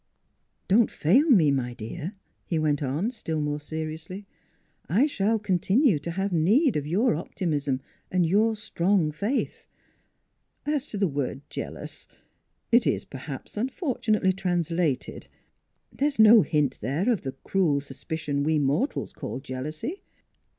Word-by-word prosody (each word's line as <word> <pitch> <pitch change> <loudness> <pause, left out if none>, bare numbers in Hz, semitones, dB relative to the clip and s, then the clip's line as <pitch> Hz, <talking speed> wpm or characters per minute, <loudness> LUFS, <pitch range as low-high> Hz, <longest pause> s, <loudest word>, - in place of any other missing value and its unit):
" - - -48
Don't 215 +4 +4
fail 260 - +3
me, 170 - +6
my 125 -3 -1
dear," 150 - -6 0.3
he 165 - 0
went 150 -2 +1
on, 150 - -1
still 165 -10 -3
more 150 0 -1
seriously; 160 +5 -6 0.6
"I 215 - +4
shall 225 -6 +1
continue 200 - +2
to 160 - -6
have 195 +3 -2
need 215 - +3
of 150 -1 -1
your 205 +11 +2
optimism 145 -5 -2 0.3
and 180 -2 +2
your 215 +6 +3
strong 185 -5 +1
faith. 205 - -2 1.0
As 295 -1 -1
to 210 - -5
the 200 -1 +2
word 140 -2 -3
'jealous'; - - -7 0.6
it 235 0 +5
is - - 0
perhaps 135 0 -8
unfortunately 220 - 0
translated. 175 -5 -1 0.6
There 285 - 0
is 295 - -3
no 220 0 +8
hint 150 -6 0
there 140 - -1
of 235 -6 +2
the 135 -1 -5
cruel 170 -7 +2
suspicion 145 +1 -4
we 155 +2 +2
mortals 145 - 0
call - - -5
jealousy. 150 - -5
170 Hz, 140 wpm, -26 LUFS, 145-215 Hz, 1.0 s, no